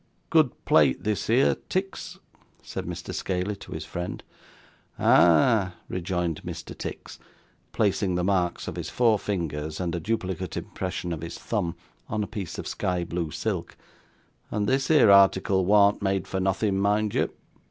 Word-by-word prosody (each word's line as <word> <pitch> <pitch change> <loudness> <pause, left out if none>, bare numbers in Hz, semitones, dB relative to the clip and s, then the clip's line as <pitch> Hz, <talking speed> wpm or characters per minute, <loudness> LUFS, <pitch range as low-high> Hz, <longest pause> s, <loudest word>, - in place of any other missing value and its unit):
'Good 155 -6 +2
plate 70 -4 +4
this 105 -1 -1
here, 120 +4 +4
Tix,' 195 +1 -3 0.5
said - - -5
Mr. - - -6
Scaley 95 +2 -2
to - - -12
his 80 0 -5
friend. 90 +4 -5 0.7
'Ah!' 95 +3 +4
rejoined 90 -3 -2
Mr. - - -7
Tix, - - -7 0.5
placing 100 -3 +1
the 90 - 0
marks 90 -2 0
of 80 - -5
his 85 -2 -4
four 115 -4 +3
fingers, 80 -6 -3
and 90 -2 -2
a 85 - -1
duplicate 95 -3 -3
impression 90 -2 -4
of 80 - -6
his 85 - -6
thumb, 85 0 -2 0.3
on 105 -1 -1
a - - -4
piece 100 -6 -6
of - - -5
sky 90 -1 -1
blue 85 -1 -3
silk; - - -3 0.7
'and 105 -1 -1
this 135 +1 +1
here 150 -10 +6
article 95 -1 +5
warn't 100 0 +5
made 95 -2 0
for 95 - -2
nothing, 95 +1 +1
mind 105 +1 +1
you. - - +1
95 Hz, 155 wpm, -26 LUFS, 85-105 Hz, 0.7 s, here